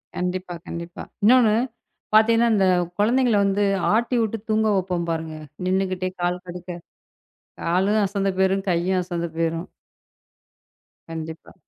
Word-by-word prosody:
கண்டிப்பா. 180 Hz, 0 st, -3 dB
கண்டிப்பா. 170 Hz, +1 st, -7 dB, 0.2 s
இன்னொன்னு, 225 Hz, -1 st, +6 dB, 0.6 s
பாத்தீங்கன்னா, 230 Hz, +2 st, +5 dB
அந்த 195 Hz, -3 st, +3 dB, 0.3 s
கொழந்தைகள 240 Hz, +2 st, +3 dB
வந்து 200 Hz, +1 st, +1 dB, 0.3 s
ஆட்டிவிட்டுத் 225 Hz, -2 st, 0 dB
தூங்க 220 Hz, 0 st, +2 dB
வெப்போம் 180 Hz, -2 st, -2 dB
பாருங்க. 160 Hz, -1 st, -4 dB, 0.3 s
நின்னுக்கிட்டே 185 Hz, -1 st, 0 dB
கால் 180 Hz, +1 st, -1 dB
கடுக்க, 180 Hz, +1 st, -7 dB, 0.9 s
காலும் 190 Hz, +5 st, +2 dB
அசந்து 195 Hz, 0 st, -1 dB
போயிரும், 190 Hz, 0 st, +2 dB
கையும் 180 Hz, +2 st, +1 dB
அசந்து 170 Hz, -1 st, -3 dB
போயிரும். 165 Hz, +1 st, -1 dB, 1.4 s
கண்டிப்பா. 160 Hz, 0 st, -7 dB
185 Hz, 110 wpm, -23 LUFS, 175-215 Hz, 1.4 s, இன்னொன்னு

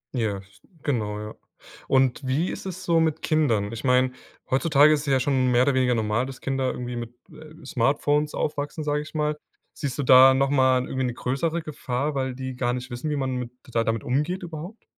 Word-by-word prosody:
Ja, 110 Hz, -5 st, 0 dB
s 100 Hz, +1 st, -23 dB, 0.2 s
genau, 105 Hz, -7 st, -1 dB
ja. 105 Hz, 0 st, -7 dB, 0.5 s
Und 130 Hz, 0 st, +2 dB
wie 150 Hz, +8 st, 0 dB
ist -, -, -7 dB
es 185 Hz, -1 st, -6 dB
so 165 Hz, -1 st, +3 dB
mit 160 Hz, -1 st, 0 dB
Kindern? 115 Hz, -10 st, +1 dB
Ich 115 Hz, -, -7 dB
meine, 125 Hz, 0 st, +3 dB, 0.4 s
heutzutage 150 Hz, +2 st, +5 dB
ist 150 Hz, -, 0 dB
es -, -, -8 dB
ja 135 Hz, -1 st, +3 dB
schon 130 Hz, -1 st, +1 dB
mehr 120 Hz, 0 st, +4 dB
oder 140 Hz, +1 st, +2 dB
weniger 125 Hz, -2 st, +2 dB
normal, 110 Hz, +3 st, 0 dB
dass 135 Hz, -1 st, -9 dB
Kinder 135 Hz, -1 st, -1 dB
irgendwie 125 Hz, 0 st, -5 dB
mit, 120 Hz, 0 st, -7 dB, 0.2 s
äh, 155 Hz, 0 st, -14 dB
Smartphones 145 Hz, +4 st, +1 dB
aufwachsen, 145 Hz, +1 st, -3 dB
sage 150 Hz, 0 st, 0 dB
ich 150 Hz, -, -11 dB
mal. 150 Hz, 0 st, -1 dB, 0.3 s
Siehst 140 Hz, -3 st, -4 dB
du 145 Hz, -, -1 dB
da 130 Hz, +1 st, +8 dB
nochmal 130 Hz, -2 st, +3 dB
irgendwie 130 Hz, -1 st, -2 dB
'ne 125 Hz, -, -2 dB
größere 160 Hz, +8 st, -1 dB
Gefahr, 140 Hz, -1 st, -3 dB
weil 130 Hz, -2 st, -2 dB
die 130 Hz, 0 st, -5 dB
gar 120 Hz, -1 st, 0 dB
nicht 125 Hz, 0 st, -6 dB
wissen, 120 Hz, +6 st, -4 dB
wie 150 Hz, -, -1 dB
man 130 Hz, -2 st, -2 dB
mit 125 Hz, -1 st, -5 dB, 0.2 s
da 115 Hz, -, +2 dB
damit 115 Hz, -1 st, -1 dB
umgeht 150 Hz, +9 st, -1 dB
überhaupt? 170 Hz, +6 st, -8 dB
130 Hz, 210 wpm, -25 LUFS, 125-150 Hz, 0.5 s, da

